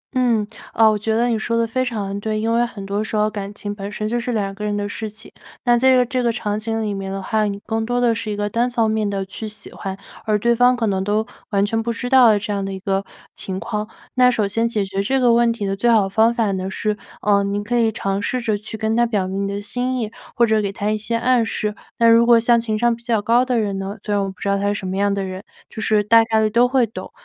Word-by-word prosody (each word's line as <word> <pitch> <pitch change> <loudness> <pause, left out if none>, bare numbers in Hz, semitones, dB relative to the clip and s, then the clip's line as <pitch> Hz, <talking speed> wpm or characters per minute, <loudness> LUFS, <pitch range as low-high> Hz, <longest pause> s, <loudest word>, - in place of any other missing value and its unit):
嗯， 235 -4 +2 0.3
呃， 220 -1 +6
我 - - 0
觉 220 +1 -1
得 235 +1 +2
你 225 -2 0
说 230 +1 -1
得 230 - +2
非 255 +3 -1
常 200 -5 -3
对， 215 0 -2
因 225 +1 0
为 235 +1 +3
很 205 -5 -6
多 200 +2 -1
时 220 - -4
候 210 0 +3
感 200 -1 -5
情 205 0 -5
本 200 0 -6
身 215 0 -3
就 240 +2 -1
是 245 +1 -3
2 200 -3 -1
个 210 +1 -8
人 205 0 -1
的 205 0 -2
事 215 +1 -5
情。 215 +1 -14 0.3
那 240 -1 +4
在 260 +2 +4
这 250 -1 +4
这 255 0 -1
个 235 - +2
场 210 -2 -2
景 225 0 -2
里 205 -1 -2
面 195 -1 -5
的 195 - -3
话， 215 +2 0
你 200 -1 -3
更 225 0 -1
多 245 +2 -1
的 240 -2 +3
是 220 -1 -4
一 - - -2
个 205 0 -1
单 235 +4 0
方 230 -2 +1
面 215 -2 0
的 195 -1 -2
去 215 +3 -7
喜 210 0 -8
欢， 195 -1 -6 0.3
而 215 -1 +2
对 235 +3 +2
方 245 +1 +4
可 230 -2 -1
能 190 -2 0
都 210 +2 0 0.2
完 200 -1 +2
全 225 +2 -1
不 235 +1 -2
知 245 +2 -4
道 240 -5 +7
这 210 0 -3
样 200 -1 -2
的 195 - -4
一 190 - -6
个 195 0 -1 0.3
情 190 -1 -4
况。 215 -2 -3 0.3
那 250 0 +5
首 220 -4 +1
先 225 +4 0
解 210 -4 -1
决 195 0 -2
这 265 +6 +1
个 240 -2 +4
问 235 0 +4
题 220 -3 -3
的 195 0 -1
最 235 +4 +1
好 215 -4 +4
方 220 +4 +3
法 225 -4 0
呢 190 0 -3
是， 210 +2 -1 0.3
呃， 200 -1 +3
您 200 +1 -2
可 240 +3 -2
以 225 -1 +3
尝 195 -1 -2
试 250 +4 -1
着 220 -3 0
去 215 +2 -7
跟 220 +1 0
他 240 0 +3
表 200 -5 -1
明 195 +1 -2
你 - - -2
的 200 +1 -4
心 250 +4 -2
意， 220 -1 -3 0.2
或 235 - +4
者 220 -1 +2
给 200 -1 -2
他 205 +2 -2
一 215 - 0
些 225 +2 -3
暗 245 0 +3
示。 210 -1 -2 0.2
那 230 - +4
如 230 +1 +6
果 235 -1 +7
像 235 0 +4
情 220 -2 -2
商 240 +1 +2
比 235 - -17
较 230 -3 +1
高 235 +4 +3
的 250 -2 0
人 200 -2 -1
呢 195 +3 -5
所 205 - -2
以 - - +2
我 195 -1 0
不 190 - -12
知 - - -4
道 200 0 +2
他 200 - 0
是 205 - 0
什 190 - -5
么 190 - -3
样 200 0 +2
的 200 -1 -1
人， 185 +1 -6 0.3
就 220 - -7
是 210 -1 +2
大 225 +2 +6
概 220 -1 +1
地 215 -1 +1
都 240 +2 +4
会 255 -2 +3
懂， 220 - -9
215 Hz, 315 characters per minute, -20 LUFS, 200-235 Hz, 0.3 s, 道